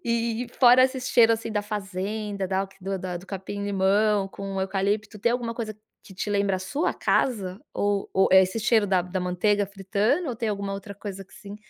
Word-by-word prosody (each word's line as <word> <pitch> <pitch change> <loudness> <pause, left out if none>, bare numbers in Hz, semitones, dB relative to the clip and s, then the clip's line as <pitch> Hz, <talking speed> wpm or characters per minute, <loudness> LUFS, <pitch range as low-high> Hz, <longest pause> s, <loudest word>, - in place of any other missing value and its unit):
E 235 0 0
e - - -13
fora 255 0 +7
esse 260 0 -1
cheiro 235 -2 +4
assim 225 0 -3
da 210 0 0
fazenda, 205 0 -4
da 190 0 0 0.2
do 195 +1 -3 0.2
do 190 - -15
capim 200 +1 -5
limão 200 +1 +2
com 195 -1 -5
eucalipto, 205 +3 -1
tem 235 +4 +2
alguma 235 -2 -2
coisa 220 -3 -4 0.3
que 190 - -14
te 195 - -4
lembra 200 -1 +1
a - - -5
sua 280 - -1
casa? 200 -6 0
Ou 205 -1 0
ou 190 - +3
é 190 0 +9
esse 190 +5 -2
cheiro 220 -1 +3
da 190 -2 +3
da 180 +1 -4
manteiga 200 +3 +1
fritando? 200 - 0
Ou 240 - -3
tem 225 -1 -2
alguma 200 -1 -3
outra 200 +1 -8
coisa 195 -1 -7
assim, 205 0 -11
205 Hz, 200 wpm, -25 LUFS, 195-225 Hz, 0.3 s, é